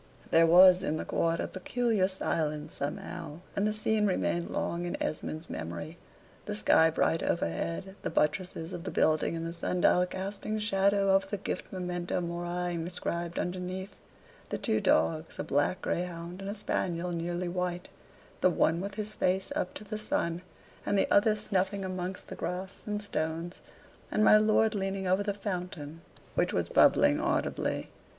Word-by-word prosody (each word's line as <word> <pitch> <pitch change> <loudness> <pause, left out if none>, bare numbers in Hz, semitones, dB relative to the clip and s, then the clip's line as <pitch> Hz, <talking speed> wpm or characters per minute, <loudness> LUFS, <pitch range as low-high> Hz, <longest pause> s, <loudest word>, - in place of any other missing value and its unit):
There 165 0 +6
was 180 +2 +8
in 155 -5 -1
the - - -4
court 165 0 0
a - - -1
peculiar 215 0 0
silence 155 -5 -2
somehow; 145 +2 -5
and 200 +1 +2
the - - +1
scene 215 0 +1
remained 175 -2 0
long 175 +1 -2
in 175 - -3
Esmond's 155 +1 -3
memory: 85 - -6 0.5
the 210 - -3
sky 160 -5 +5
bright 165 +1 +1
overhead; 85 - -2
the - - -2
buttresses 165 +1 0
of 170 - -5
the 190 - -4
building 155 +1 +2
and 165 0 -3
the 165 - -4
sun 175 +1 -2
dial 180 0 +4
casting 200 +3 -4
shadow 200 -1 +2
over 195 0 +3
the 205 - -3
gilt 195 - -4
memento 180 -2 -2
mori 175 0 -2
inscribed 170 0 -3
underneath; 185 +2 -3 0.6
the - - -2
two 110 - 0
dogs, 85 - +1
a - - -2
black 145 +7 0
greyhound 175 +1 -3
and 195 - -5
a 205 - -3
spaniel 180 -4 -1
nearly 175 +1 -2
white, 180 0 -3 0.5
the 185 - +5
one 170 -1 +2
with 200 0 -5
his 215 0 -4
face 185 0 0
up 180 - -2
to - - -7
the 215 +1 -5
sun, 170 -5 -1 0.4
and 205 - +1
the - - +4
other 210 +1 +5
snuffing 195 -1 0
amongst 185 0 -4
the - - -7
grass 180 +3 -4
and 210 0 -2
stones, 165 -1 -3 0.5
and 215 - +2
my 215 - +8
lord 215 +1 +4
leaning 195 -1 -2
over 185 +2 +2
the 205 0 0
fountain, 180 -6 -5 0.3
which - - +1
was - - 0
bubbling 70 0 +5
audibly. - - -1
180 Hz, 170 wpm, -30 LUFS, 165-195 Hz, 0.6 s, was